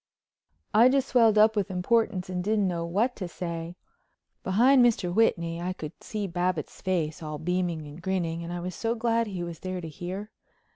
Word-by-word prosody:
I 235 +4 +7
just 270 0 +1
swelled 225 -3 +5
up 215 +1 +6
with 205 -3 0
importance 185 0 +1
and 180 -1 -3
didn't 210 0 +1
know 170 -2 -2
what 215 +9 +1
to 185 - -4
say. 170 -1 -5 0.7
Behind 245 +7 +5
Mr. 215 -7 +2
Whitney 170 -6 +1
I 180 +1 -2
could 155 -5 -7
see 210 -2 -3
Babbitts' 175 -3 -2
face, 170 -5 -1
all 155 -1 -5
beaming 175 -1 -1
and 150 +3 -10
grinning, 170 -2 -2
and 170 - -6
I 175 0 -4
was 180 +1 -4
so 230 +6 -1
glad 230 0 +1
he 185 -4 -4
was 170 -2 -6
there 185 0 -4
to 165 - -6
hear. 185 +7 -6
185 Hz, 190 wpm, -27 LUFS, 170-215 Hz, 0.7 s, I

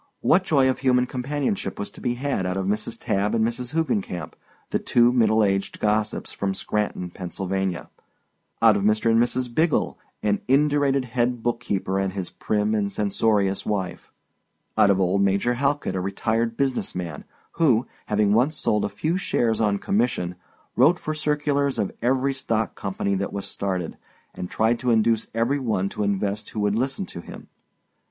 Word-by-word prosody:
What 180 +3 +4
joy 140 -7 +3
of 130 - 0
human 125 -1 +3
companionship 145 +11 -2
was 205 -1 -4
to - - -13
be 120 -2 -1
had 130 -7 -1
out 90 +1 -2
of 95 - -1
Mrs. 105 +2 -2
Tabb 100 +2 0
and 110 -1 +2
Miss 120 +1 -2
Hoogencamp, 160 - -2 0.4
the - - +1
two 120 0 +3
middle 110 -3 +4
aged 95 -1 0
gossips 105 0 0
from 95 -1 -2
Scranton, 100 -3 -2
Pa.—out 95 +4 -2
of - - -1
Mr. 110 +2 +2
and 115 +1 +4
Mrs. 120 0 -1
Biggle, 160 +3 +1 0.2
an 105 -1 +1
indurated 140 -1 +3
head 120 0 -1
bookkeeper 100 -5 -1
and 95 -1 -1
his 95 -3 -4
prim 105 0 0
and 100 -2 0
censorious 100 -1 +1
wife—out 100 0 -3
of 100 -1 +3
old 95 +1 +2
Major 100 +5 +2
Halkit, 140 +3 0
a 95 - -1
retired 115 +4 -1
business 135 -2 -1
man, 85 -5 -5 0.4
who, 130 -7 +4 0.2
having 105 -1 +2
once 135 +8 +2
sold 105 - +1
a 105 - 0
few 155 - -1
shares 115 - 0
on 105 -2 +2
commission, 100 -4 0 0.4
wrote 150 +9 +5
for 155 - -4
circulars 145 -2 0
of 100 - -1
every 130 +3 +1
stock 110 -5 -1
company 95 0 -2
that 100 0 -1
was 100 -1 -4
started, 95 -3 -3 0.4
and 90 - -6
tried 115 +2 +1
to 125 - -1
induce 115 -1 +2
every 120 +5 +1
one 105 -7 0
to - - -5
invest 100 +1 -1
who 110 - -5
would 105 0 +2
listen 135 - -1
to 85 - -8
him? - - -11
110 Hz, 170 wpm, -24 LUFS, 100-130 Hz, 0.4 s, wrote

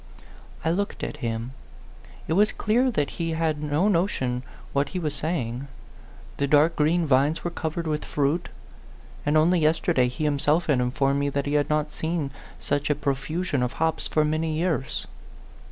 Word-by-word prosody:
I 160 - +3
looked 200 +4 -2
at - - -4
him. 115 -2 -3 0.8
It - - 0
was 210 +4 +4
clear 240 +4 +2
that 150 - 0
he 165 -1 -1
had 160 -2 0
no 150 +6 +1
notion 165 -10 +1 0.3
what 140 +1 +1
he 185 - -4
was 155 -4 -1
saying. 135 -5 -2 0.7
The 140 - +1
dark 150 +3 +4
green 160 +3 +2
vines 140 +3 +2
were 175 - -2
covered 165 0 -3
with 150 -1 -1
fruit; 145 +4 0 0.8
and 150 +1 +4
only 170 +3 +4
yesterday 155 -5 +2
he 125 +6 -4
himself 150 +3 +2
had 145 -5 +2
informed 135 +2 +1
me 140 0 +1
that 140 0 -1
he 145 - -2
had 145 -1 +2
not 150 0 0
seen 160 -3 -2 0.3
such 145 0 -1
a 150 - +3
profusion 145 +2 -1
of 125 0 -1
hops 160 0 0
for 155 -1 +2
many 155 +1 0
years. 160 -5 -1
150 Hz, 170 wpm, -25 LUFS, 140-165 Hz, 0.8 s, was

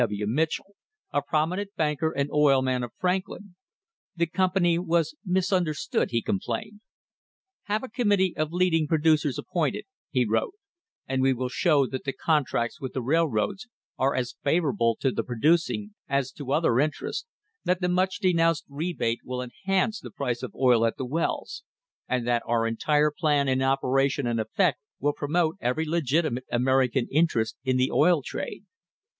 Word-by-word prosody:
W. 105 0 -3
Mitchell, 160 - -1 0.4
a 145 - +1
prominent 180 +8 -1
banker 150 0 0
and 140 0 -2
oil 140 -3 +4
man 130 -1 0
of 120 - -5
Franklin. 185 +1 -2 0.6
The 170 0 +2
company 175 0 +1
was 170 - +1
misunderstood, 180 -5 0
he 115 -2 -1
complained. 210 - -3 0.8
"Have 210 +3 -1
a - - -4
committee 205 -6 +1
of 155 0 -1
leading 170 -3 +2
producers 155 -3 +2
appointed," - - -2 0.2
he 125 -3 +1
wrote, 115 - 0 0.5
"and 130 0 0
we 135 0 +4
will 125 0 -3
show 145 0 +3
that 130 0 -5
the 135 - -3
contracts 140 -7 0
with 130 -2 -5
the 130 - -2
railroads 160 - 0 0.3
are 135 +1 +2
as 125 -1 -2
favourable 135 - +2
to 135 - +2
the - - -1
producing 160 - +1 0.2
as 140 -2 0
to 140 -3 -7
other 145 -5 +3
interests; 155 - -2 0.4
that 180 0 +1
the 180 - 0
much 185 +1 +1
denounced 165 -5 +2
rebate 140 -6 -2
will 125 0 -4
enhance 195 - -1
the - - -9
price 125 -9 -3
of - - -7
oil 125 -3 +4
at 115 - +1
the 130 - -3
wells, 160 +7 -2 0.5
and 125 -2 0
that 120 -1 +2
our 115 -1 +1
entire 150 +6 +2
plan 145 -2 +1
in 130 0 +1
operation 135 +1 +1
and 120 -1 0
effect 140 - +1 0.2
will 145 +1 +1
promote 160 +4 0
every 125 +6 0
legitimate 155 -4 0
American 130 0 +2
interest 135 -8 +1
in 130 -1 +1
the 130 +1 +1
oil 165 -2 +4
trade." - - -5
150 Hz, 160 wpm, -26 LUFS, 130-170 Hz, 0.8 s, oil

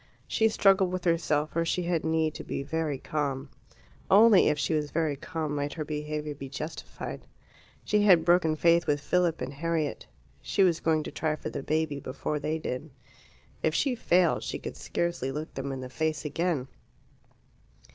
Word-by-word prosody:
She 220 0 +3
struggled 195 -3 +4
with 185 -1 -3
herself, 155 -3 +1
for 165 - 0
she 175 +2 -1
had 170 -2 0
need 160 -1 +1
to - - -7
be - - -4
very 155 -1 -2
calm; 140 -1 -3 0.6
only 210 0 +7
if 150 - +1
she 145 - 0
was 150 -1 0
very 155 -2 0
calm 155 +1 -4
might 145 0 -2
her 155 -2 -4
behaviour 150 0 -3
be 135 -1 -8
justified. 150 +4 -7 0.6
She 210 0 +2
had 185 -5 +6
broken 170 -2 +4
faith 170 +1 +3
with 145 -1 +2
Philip 170 +3 +1
and 135 - -4
Harriet: 160 0 -2 0.3
she 195 - +2
was 175 -3 +3
going 160 -1 +1
to - - -6
try 155 -1 -1
for - - -6
the - - -4
baby 155 0 -1
before 140 +3 -3
they 155 +2 -1
did. 155 -1 -5 0.7
If 160 0 +1
she 275 - +2
failed 180 -7 +2
she - - -4
could - - -7
scarcely 170 -6 -2
look 150 +3 -5
them 135 0 -4
in 135 -1 -5
the 130 - -5
face 155 +3 -2
again. 150 -2 -1
155 Hz, 180 wpm, -28 LUFS, 145-170 Hz, 0.7 s, only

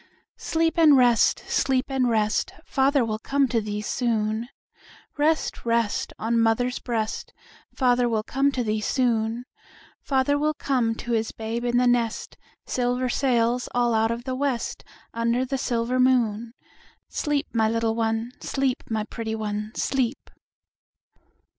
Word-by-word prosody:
Sleep 325 +1 0
and 305 -4 +7
rest, 245 -2 +4
sleep 260 -2 +1
and 260 -2 +1
rest, 215 -2 0
Father 270 -2 +2
will 215 -1 -3
come 275 +3 +1
to 230 -2 +1
thee 210 0 -4
soon; 225 0 -1 0.7
Rest, 310 +2 0
rest, 230 -2 0
on 230 +1 0
mother's 230 +3 +1
breast, 225 -3 -3 0.4
Father 245 -2 +2
will 220 -2 0
come 275 +4 +1
to 250 - -1
thee 215 -1 -1
soon; 230 0 0 0.6
Father 275 +1 +1
will 305 +1 0
come 245 -6 0
to 240 - -6
his 225 -1 0
babe 225 +2 -4
in 240 0 +1
the 250 - +3
nest, 240 -2 0 0.3
Silver 250 0 -1
sails 245 -1 +1
all 240 -1 +2
out 220 0 +2
of 235 +1 -3
the 260 0 -3
west 265 -2 -2 0.3
Under 235 +2 0
the 270 +1 -3
silver 245 0 -1
moon; 235 -3 +2 0.5
Sleep, 295 -1 -2
my 220 -2 +2
little 230 0 0
one, 225 +1 -1
sleep, 270 -2 -1
my 220 -1 -1
pretty 220 +1 -5
one, 210 0 -4
sleep. 260 -1 -1
240 Hz, 145 wpm, -25 LUFS, 225-260 Hz, 0.7 s, and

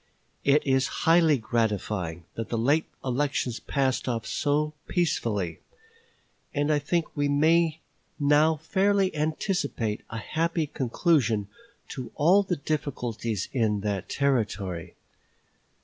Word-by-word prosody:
It 140 +2 +3
is 135 -1 +2 0.2
highly 165 -3 +5
gratifying 105 -7 -2
that 115 - -5
the 115 - -1
late 145 +8 +2 0.2
election 130 -1 0
passed 135 -2 0
off 115 -3 -2
so 150 +1 0
peacefully; 115 - -1 1.0
and 145 +1 +2
I 150 - +2
think 165 +3 -1
we 145 0 +1
may 160 +2 +3 0.4
now 150 +2 +4
fairly 190 +4 +1
anticipate 150 - -1
a 115 - -5
happy 160 +8 -1
conclusion 125 - +1 0.4
to 130 -2 -6
all 180 +7 +5
the 190 -3 -1
difficulties 120 - -3
in 110 -5 +1
that 100 -2 -3
Territory. 100 -10 -1
140 Hz, 115 wpm, -27 LUFS, 115-155 Hz, 1.0 s, highly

